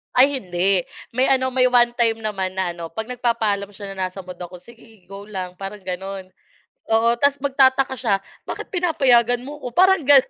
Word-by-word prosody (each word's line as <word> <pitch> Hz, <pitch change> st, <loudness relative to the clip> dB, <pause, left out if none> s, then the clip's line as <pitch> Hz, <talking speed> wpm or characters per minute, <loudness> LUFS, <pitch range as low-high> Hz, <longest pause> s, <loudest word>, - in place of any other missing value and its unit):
Ay 270 Hz, +1 st, +5 dB
hindi. 180 Hz, -1 st, 0 dB, 0.3 s
May 255 Hz, +3 st, +2 dB
ano, 260 Hz, -1 st, +2 dB
may 255 Hz, 0 st, +3 dB
1 240 Hz, -1 st, +4 dB
time 225 Hz, -2 st, +2 dB
naman 190 Hz, -3 st, -3 dB
na 190 Hz, -2 st, -1 dB
ano, 170 Hz, -1 st, -7 dB
'pag 220 Hz, +2 st, -5 dB
nagpapaalam 225 Hz, -5 st, -1 dB
siya 200 Hz, 0 st, -8 dB
na 190 Hz, -1 st, -2 dB
nasa 185 Hz, +1 st, -9 dB
mood 180 Hz, 0 st, -10 dB
ako, 180 Hz, 0 st, -8 dB
"Sige 225 Hz, -1 st, -18 dB
go 200 Hz, +1 st, -9 dB
lang," 185 Hz, -3 st, -6 dB
parang 195 Hz, +1 st, -7 dB
gano'n. 190 Hz, +1 st, -6 dB, 0.6 s
Oo, 230 Hz, +1 st, +4 dB
tapos 280 Hz, +2 st, +3 dB
magtataka 265 Hz, -1 st, +3 dB
siya, 220 Hz, -4 st, +1 dB, 0.3 s
"Bakit -, -, -6 dB
pinapayagan 245 Hz, -9 st, +3 dB
mo 295 Hz, +1 st, -8 dB
ko?" -, -, -5 dB
Parang 380 Hz, -1 st, +5 dB
gano'n. 270 Hz, -1 st, +6 dB
225 Hz, 185 wpm, -21 LUFS, 190-260 Hz, 0.6 s, gano'n